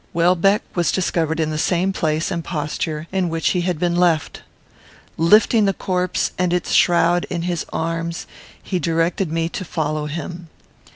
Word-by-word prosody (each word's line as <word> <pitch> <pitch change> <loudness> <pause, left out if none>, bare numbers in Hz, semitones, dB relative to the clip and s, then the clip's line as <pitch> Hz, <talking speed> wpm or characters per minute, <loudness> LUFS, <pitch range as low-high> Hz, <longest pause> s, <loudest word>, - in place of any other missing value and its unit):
Welbeck 180 +4 +3
was 175 -2 +1
discovered 165 -3 0
in 155 -1 0
the 155 - -2
same 185 +3 +1
place 160 0 -1
and 170 -2 -2
posture 155 -1 -3
in 190 -2 0
which 165 0 0
he 180 - +1
had 175 -1 -1
been 175 +1 0
left. 175 -3 +1 0.7
Lifting 210 +6 +4
the 195 - +2
corpse 180 -1 -1
and 180 -1 +1
its 180 0 -1
shroud 175 0 +3
in 170 -2 -3
his 175 -2 -2
arms, 165 +1 -3 0.4
he 185 - -2
directed 165 +2 0
me 165 0 0
to 185 - -5
follow 155 -3 -2
him. 170 +2 -6
170 Hz, 165 wpm, -20 LUFS, 160-180 Hz, 0.7 s, Lifting